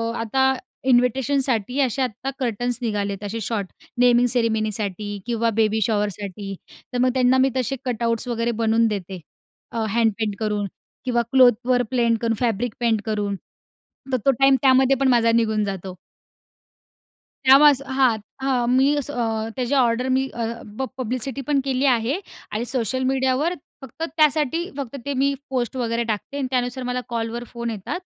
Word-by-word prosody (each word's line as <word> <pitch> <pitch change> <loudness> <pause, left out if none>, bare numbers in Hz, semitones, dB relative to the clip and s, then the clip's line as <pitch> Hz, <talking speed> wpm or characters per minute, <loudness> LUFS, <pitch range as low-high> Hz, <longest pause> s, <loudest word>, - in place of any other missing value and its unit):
आता 265 +4 +2 0.4
इन्व्हिटेशनसाठी 250 -1 +1
असे 265 0 0
आता 255 +1 -2
कर्टन्स 245 -1 -1
निघालेत 205 -3 -2
असे 210 +3 -4
शॉर्ट. 205 -2 -2 0.3
नेमिंग 245 0 +5
सेरेमनीसाठी 215 -4 -1
किंवा 230 -1 0
बेबी 220 0 +2
शॉवरसाठी. 205 -2 -2 0.4
तर - - -1
मग 255 - +4
त्यांना 255 0 +3
मी 260 +1 +4
तसे 260 +1 -1
कटआउट्स 235 -1 0
वगैरे 235 -1 -1
बनवून 225 +1 +3
देते. 195 -3 -4 0.5
अ, 225 -1 -2
हँडपेंट 220 -1 0
करून 210 -2 -1 0.4
किंवा 240 -2 +2
क्लोथवर 245 -1 +4
प्लेंट 235 -2 +2
करून 230 -1 +1
फॅब्रिक 235 -1 0
पेंट 230 -3 +1
करून. 210 -2 -1 0.8
तर 255 - +2
तो 275 - +6
टाईम 270 0 +6
त्यामध्येपण 265 0 +4
माझा 235 -2 +4
निघून 220 -2 +2
जातो. 190 -2 -5 1.5
त्यामुळ 275 +3 +8
असं 275 0 -4
हां. 260 -4 +3 0.3
हां. 255 -3 +1
मी 275 +3 +4
असं 290 0 -2
अ, 225 -3 -1
त्याच्या 260 +2 0
ऑर्डर 245 0 +2
मी 265 0 +1
अ, 235 -1 -2 0.3
प - - -3
प - - 0
पब्लिसिटीपण 260 +3 -2
केली 265 0 0
आहे 250 +4 +2 0.3
आणि 215 +3 -2
सोशल 255 0 -1
मीडियावर 265 +5 +1 0.3
फक्त 265 +4 -8
त्यासाठी 310 +2 +2
फक्त 275 -2 -5
ते 285 - -2
मी 280 0 +2 0.2
पोस्ट 250 -2 -2
वगैरे 235 -1 0
टाकते 215 +7 -5
आणि 275 -2 -1
त्यानुसार 250 0 -1
मला 250 0 -1
कॉलवर 230 0 -3
फोन 235 -1 -3
येतात. 215 - -4
240 Hz, 155 wpm, -22 LUFS, 220-260 Hz, 1.5 s, त्यामुळ